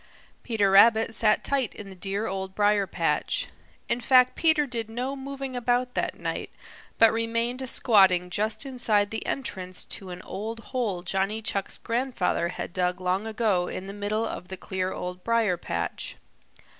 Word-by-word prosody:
Peter 210 -5 +1
Rabbit 225 +3 +6
sat 215 -1 +3
tight 270 -5 0
in 205 - -8
the 190 - -10
dear 195 +3 -2
Old 190 -1 -4
Briar 205 -1 +3
patch. - - 0 0.4
In 235 +1 0
fact 255 +1 +5
Peter 315 -2 +3
did 230 -4 -3
no 250 +4 -3
moving 270 -1 -6
about 245 +1 0
that - - -2
night, - - -3 0.5
but 225 0 +6
remained 230 +3 -1
squatting 190 -8 +4
just 215 +6 -1
inside 220 -6 +1
the 220 - -3
entrance 185 -9 -4
to 190 - -5
an 180 0 -8
old 220 +4 -5
hole 210 -9 -1
Johnny 195 +4 0
Chuck's 200 -3 -3
grandfather 235 -8 0
had 175 - -6
dug 180 -1 0
long 185 +3 -1
ago 215 -5 +1
in 185 - -5
the 195 - -7
middle 205 +2 -1
of 180 - -6
the 190 0 -7
clear 185 0 -3
Old 180 0 -5
Briar 230 -5 +2
patch. 85 - -4
215 Hz, 165 wpm, -26 LUFS, 190-240 Hz, 0.5 s, Rabbit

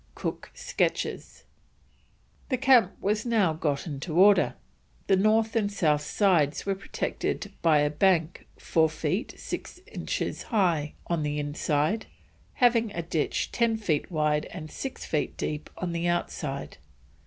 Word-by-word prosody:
COOK - - -5
SKETCHES. - - -2 1.1
The 260 - +1
camp 250 -6 +5
was 210 +2 0
now 215 -9 +2
got 150 -3 -1
into 155 +1 -4
order; 195 -1 +5 0.5
the 195 - +4
north 220 +3 +2
and 205 -3 +1
south 155 -7 +2
sides 165 -6 +2
were 195 - +1
protected 195 +1 -3
by 155 -3 +4
a 145 0 +1
bank 170 0 +1
4 160 -1 +2
feet 160 +6 -2
6 - - -6
inches - - -3
high 170 - +1
on 170 -2 -1
the 150 0 -2
inside, 150 +6 0 0.5
having 235 -3 +3
a 170 - -3
ditch 165 -2 -1
10 230 -2 +1
feet 170 -9 -1
wide 150 -3 +1
and 155 -3 -8
6 270 - -6
feet 150 - -2
deep 150 0 -4
on 180 -1 -3
the 170 +1 -1
outside. 150 - -3
175 Hz, 140 wpm, -27 LUFS, 150-210 Hz, 1.1 s, camp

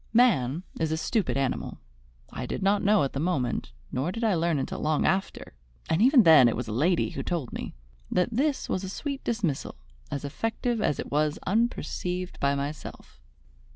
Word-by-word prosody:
Man 180 - +3 0.2
is 160 -1 0
a 160 - 0
stupid 205 - 0
animal. 135 -2 -2 0.5
I - - -5
did - - -3
not 200 +1 +3
know 205 -2 +4
at 135 - -2
the 135 - -2
moment, 145 - -1 0.2
nor 140 +7 -1
did 230 +4 -5
I 220 -3 +3
learn 170 -2 +1
until 135 - -3
long 155 -1 +1
after, 190 - -1 0.4
and 160 - +2
even 255 0 +7
then 155 -8 +8
it 115 - +1
was 125 - -4
a - - -4
lady 165 +10 +1
who - - -4
told 170 -8 -3
me, - - -6 0.3
that 180 +4 +1
this 275 +5 0
was 185 - -2
a 190 - -4
sweet 275 +7 -4
dismissal, 200 - -2 0.3
as 140 0 -4
effective 225 - -2
as 145 - +1
it - - -5
was 150 +1 +1
unperceived 185 -4 -1
by 140 0 +2
myself. 140 - -6
170 Hz, 190 wpm, -27 LUFS, 140-215 Hz, 0.5 s, then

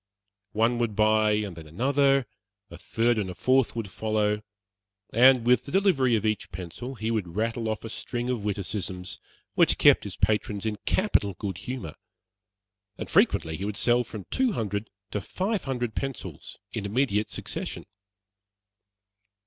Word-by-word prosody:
One 115 +2 +2
would 115 -3 0
buy, 110 0 +4
and 105 -4 -2
then 80 -1 -10
another; 135 - +2 0.5
a - - -9
third 115 0 +1
and 100 -3 -2
a 90 - -6
fourth 130 +2 +2
would 110 -5 -4
follow; 105 0 0 0.7
and 125 +1 +6
with 125 +1 +4
the 140 - -8
delivery 175 - +3
of 110 - -1
each 110 -5 -1
pencil 95 +10 -7
he 110 0 -2
would 95 -7 -2
rattle 115 +1 -1
off 110 - -3
a 115 - -6
string 120 +2 -4
of 125 -4 -2
witticisms 95 -2 -3 0.3
which - - +4
kept - - +6
his - - -6
patrons 105 0 0
in 105 -1 -1
capital 105 - +2
good 95 -3 -4
humor; 120 - -5 1.0
and - - -6
frequently 80 -1 +3
he 95 - -4
would 105 -1 -3
sell 120 +2 +3
from 110 -3 -8
two 260 -4 +2
hundred 105 - -3 0.2
to 105 - -2
five 195 - -2
hundred 125 -4 -2
pencils 135 -2 -5 0.2
in - - -3
immediate 105 -2 +1
succession. - - -5
110 Hz, 155 wpm, -27 LUFS, 100-125 Hz, 1.0 s, and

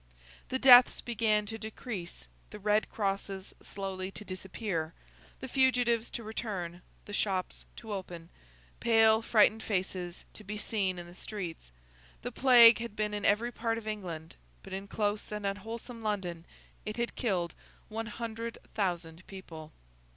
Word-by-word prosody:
The 260 - 0
deaths 255 -2 +8
began 220 -3 +1
to 225 +2 -6
decrease, 210 - -6 0.2
the - - -8
red 210 +1 +1
crosses 195 -2 -3
slowly 190 -1 -4
to 210 - -8
disappear, 185 -3 -4 0.5
the - - -4
fugitives 245 -3 +3
to 235 - -6
return, 190 -6 -4 0.2
the 205 - -9
shops 190 -3 -1
to 220 -2 -7
open, 175 -4 -6 0.5
pale 225 -1 +5
frightened 220 -1 +4
faces 185 -3 -3
to 215 - -11
be 210 +1 -5
seen 200 -3 -1
in 175 - -6
the 175 - -12
streets. 180 - -6 0.5
The 245 - -3
Plague 240 -3 +8
had 235 -2 -5
been 210 0 -1
in 205 -1 -2
every 225 +4 +3
part 230 -1 -1
of 220 -1 -7
England, 175 -7 -5 0.3
but - - -9
in 195 +1 -5
close 205 0 -1
and 210 -1 -4
unwholesome 225 +4 -5
London 185 -6 -2 0.4
it 215 +1 -5
had 235 0 -2
killed 180 -7 0 0.3
one 225 +1 -4
hundred 230 +1 -5 0.2
thousand 175 -4 -2
people. 160 -5 -9
210 Hz, 150 wpm, -31 LUFS, 185-225 Hz, 0.5 s, deaths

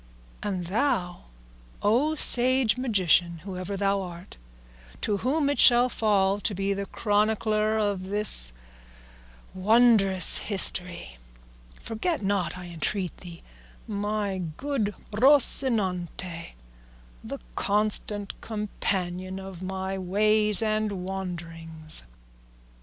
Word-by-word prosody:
And 190 -4 -4
thou, 185 -3 -2 0.6
O 255 +10 +1
sage 255 -5 +4
magician, 185 -8 +1
whoever 190 0 -6
thou 200 0 0
art, 175 0 -10 0.7
to 205 - -1
whom 280 +7 -1
it 285 - -1
shall 245 0 +6
fall 200 -4 +1
to 205 0 -1
be 195 +1 -2
the 200 0 -5
chronicler 215 0 0
of 200 -3 -2
this 200 - 0 1.0
wondrous 200 -1 +4
history, 180 - -1 0.6
forget 230 - -4
not, 190 -4 -2
I 180 - -9
entreat 175 +2 -4
thee, 170 -2 -12 0.4
my 205 -2 -3 0.2
good 260 -8 -3 0.2
Rocinante, 205 - +3 0.7
the - - -7 0.2
constant 205 0 -1
companion 190 -3 -4
of 190 -2 -10
my 190 +1 -5
ways 210 +2 +1
and 215 -4 -2
wanderings." 165 -4 -3
200 Hz, 95 wpm, -25 LUFS, 185-215 Hz, 1.0 s, shall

